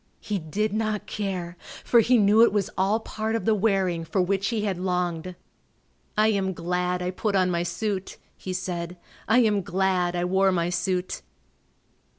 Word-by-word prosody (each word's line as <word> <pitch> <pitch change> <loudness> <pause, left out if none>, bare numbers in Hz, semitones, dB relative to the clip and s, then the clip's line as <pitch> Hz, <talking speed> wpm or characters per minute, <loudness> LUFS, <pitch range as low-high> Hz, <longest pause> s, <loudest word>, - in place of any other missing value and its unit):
He 205 -2 -3
did 200 +6 -2
not 215 -1 -1
care, 185 -4 -4 0.3
for 235 - +5
he 245 +3 +4
knew 210 +1 +5
it 235 - +6
was 205 -2 -1
all 195 +4 +2
part 220 0 -3
of 225 - -2
the 220 - +4
wearing 190 -5 +1
for 175 +4 -2
which 195 +2 +1
he 225 -1 -1
had 195 -4 -1
longed. 180 -1 -2 0.8
"I 215 +1 +4
am 195 -3 0
glad 180 +1 -1
I 180 - -1
put 200 +2 -1
on 185 -1 +3
my 170 -1 0
suit," 195 +2 -3 0.2
he 185 - -7
said; 180 -1 -4 0.3
"I 225 +4 +5
am 210 -3 +2
glad 180 -1 0
I 175 0 0
wore 190 +1 +3
my 175 -1 0
suit." 180 +1 -1
190 Hz, 175 wpm, -25 LUFS, 180-210 Hz, 0.8 s, it